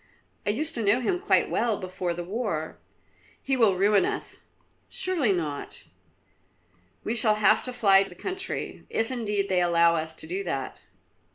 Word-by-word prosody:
I - - +3
used 300 +9 0
to 235 - -3
know 205 +4 +3
him 355 +9 0
quite 400 - +2
well 230 -3 0
before 185 -1 -3
the 175 - -4
war." 190 -5 -3 0.6
"He 270 - -1
will 220 -7 +4
ruin 200 +1 +4
us." - - -3 0.5
"Surely 335 - +1
not." 155 -6 -4 1.2
"We 225 - -2
shall 215 -2 +4
have 215 +1 +4
to 255 - -4
fly 200 -6 +5
the 195 -2 -5
country, 380 - -5
if 225 +2 -1
indeed 210 -5 -1
they 185 -2 +2
allow 170 -1 +4
us 160 0 -3
to - - -2
do 185 +5 -3
that." 135 -7 -4
205 Hz, 165 wpm, -26 LUFS, 175-240 Hz, 1.2 s, fly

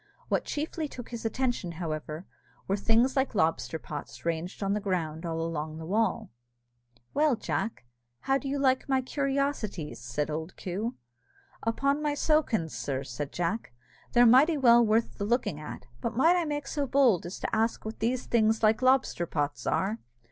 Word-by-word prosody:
What - - +1
chiefly 310 +1 -3
took 245 -4 -9
his 235 -1 -6
attention, 240 -7 -1
however, 155 0 -4 0.4
were 195 - +2
things 225 +5 +3
like 265 -3 +1
lobster 160 -2 +1
pots 150 -1 -8
ranged 170 +4 -2
on 195 0 +1
the 210 - 0
ground 175 -5 -2
along 165 -2 -3
the 160 - -7
wall. 210 - 0 0.8
"Well, 295 -3 +3
Jack, 220 - -3 0.4
how 270 0 +2
do 270 - -5
you 280 - -1
like 265 -1 +2
my 265 -1 +2
curiosities?" 270 - -2
said 145 +6 -2
old 160 +4 -5
Coo. 205 +7 -3 0.7
"Upon 275 +6 +1
my 295 -1 +1
sowkins, 265 - +1
sir," 135 -1 -2
said 135 +2 -5
Jack, 175 - -2 0.4
"they're 245 0 +7
mighty 275 +7 +6
well 240 -3 +6
worth 225 +1 +1
the - - -1
looking 210 - 0
at; 150 -4 -8 0.2
but 235 -1 -3
might 330 +7 +5
I 350 -2 +1
make 290 -2 -2
so 280 0 -2
bold 245 -10 +3
as 180 - -6
to - - -2
ask 225 +1 0
what 220 - -6
these 240 +3 0
things 220 -1 +2
like 215 +2 +4
lobster 255 -9 +3
pots 145 -2 -2
are?" 210 +4 0
220 Hz, 170 wpm, -29 LUFS, 165-265 Hz, 0.8 s, they're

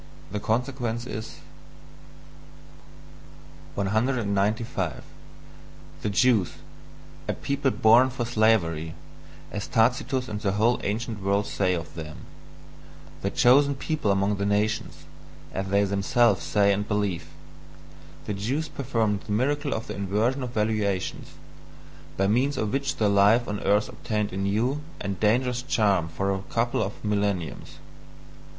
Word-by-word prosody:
The 105 - -2
consequence 120 +1 -1
is... 110 -2 -7 2.3
195. 105 - 0 1.0
The 105 - -1
Jews 105 -4 +3 0.7
a - - 0
people 140 0 -1
"born 120 +2 +5
for 125 -2 -3
slavery," 95 -9 +1 0.6
as 100 - -4
Tacitus 125 +2 +1
and 105 -1 -5
the 100 -2 0
whole 110 +4 +2
ancient 110 0 -3
world 100 +1 +1
say 95 -3 0
of 85 -1 -6
them; 75 -2 -7 1.0
"the 100 - 0
chosen 140 +6 +4
people 150 -4 -2
among 100 +1 +2
the 100 - -1
nations," 105 +1 -1 0.5
as 95 +1 -3
they 100 +1 +3
themselves 100 +2 +2
say 100 -1 +3
and 105 +1 -2
believe 105 -4 -1 1.0
the 105 - -2
Jews 130 +11 -2
performed 115 -8 -1
the - - -8
miracle 145 +6 0
of 110 - -2
the 105 - -6
inversion 105 +7 0
of 125 - -3
valuations, 105 -4 -1 0.8
by 95 - +2
means 130 +7 +2
of 110 -3 -1
which 135 0 -1
life 105 +3 +4
on 105 0 -3
earth 105 +2 +2
obtained 105 -3 -3
a - - -4
new 110 +9 0 0.2
and 100 -2 -4
dangerous 125 +3 +2
charm 100 -9 +2
for 95 +5 -1
a 95 - -3
couple 115 +1 0
of 100 +2 -4
millenniums. 100 -5 -1
105 Hz, 130 wpm, -26 LUFS, 100-120 Hz, 2.3 s, born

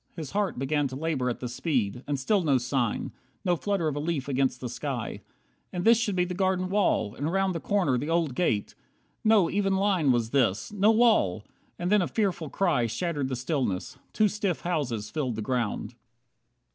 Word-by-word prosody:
His 155 -5 -6
heart 205 -2 -1
began 140 +2 0
To 130 - -7
labour 140 -4 -1
at 120 - -4
the 125 - -3
speed. 125 -3 -1
And 145 -2 -1
still 200 +9 +2
no 145 -6 +3
sign, 125 -2 -1 0.3
No 180 -1 +3
flutter 195 -1 -1
of 150 - -1
a - - -2
leaf 150 -3 -2
against 130 -2 0
the 125 - -4
sky. 125 -1 -4 0.5
And 180 -1 -3
this 230 0 +6
should 210 -4 0
be 180 -1 +2
the 180 - -4
garden 185 0 0
wall, 195 - +1
and 145 +6 -3
round 195 0 +1
The 165 - -3
corner, 175 -10 +1
the 145 - -4
old 165 -5 +1
gate. 120 - 0 0.5
No 215 -5 +5
even 195 0 +1
line 190 -7 +2
Was 120 -2 0
this! 115 - +1
No 205 +1 +3
wall! 220 - +3 0.3
And 175 +2 -2
then 210 -1 +5
a 175 - 0
fearful 185 -8 -1
cry 155 -11 +1
Shattered 145 +4 -2
the 130 - -2
stillness. 125 - -2
Two 215 - +3
stiff 200 -4 -2
houses 130 -12 -2
filled 135 -7 -2
the 110 - -3
ground. 120 -1 -2
155 Hz, 195 wpm, -27 LUFS, 125-190 Hz, 0.5 s, this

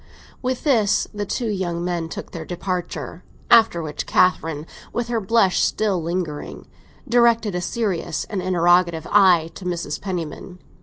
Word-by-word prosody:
With 255 -1 -2
this 225 -9 +2
the 205 -1 -4
two 235 +3 -2
young 175 -4 -2
men 170 -2 -2
took - - -7
their 165 - -6
departure; 175 -3 -4 0.3
after 220 -7 +5
which 150 -1 -5
Catherine, 160 -4 +2 0.3
with 240 0 -3
her 230 -2 0
blush 195 -2 +3
still 200 -5 +1
lingering, 165 -3 -4 0.4
directed 235 -3 +3
a 180 - -2
serious 185 -6 -2
and 200 -4 -4
interrogative 175 -2 +2
eye 180 -5 +5
to - - -10
Mrs. 170 -4 -3
Penniman. 180 -2 -5
180 Hz, 145 wpm, -22 LUFS, 170-210 Hz, 0.4 s, after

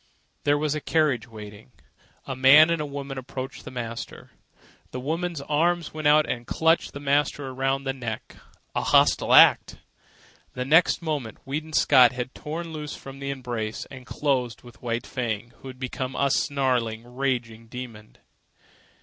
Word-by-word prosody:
There 145 0 +4
was 150 0 0
a 155 - -3
carriage 140 -9 +1
waiting. 105 +1 -12 0.5
A 130 - -4
man 140 +5 +7
and 165 -2 0
a 150 - -3
woman 140 -1 -6
approached 130 +1 -7
the - - -6
master. 115 -2 -7 0.6
The 125 - -6
woman's 165 +3 -3
arms 165 +3 0
went 155 -1 -1
out 150 +1 +5
and 120 -1 -4
clutched 160 +1 +2
the 140 - -6
master 145 -1 0
around 135 +1 -1
the 135 -1 -2
neck—a 120 -4 -7
hostile - - +3
act! - - +6 0.8
The 125 - -3
next 160 +5 +4
moment 145 -9 -3
Weedon 155 +4 -4
Scott 130 -5 +6
had 125 +1 -5
torn 165 +2 -6
loose 150 -1 -6
from 135 0 -11
the 140 0 -4
embrace 120 -5 -4
and 130 -1 -11
closed 130 -5 -1
with 120 -1 -15
White 120 -1 -2
Fang, 120 -2 -4
who - - -11
had 130 -1 -9
become 130 0 -4
a 140 -1 +1
snarling, 125 -6 0
raging 120 -3 -3
demon. 115 -3 -9
135 Hz, 160 wpm, -25 LUFS, 120-150 Hz, 0.8 s, man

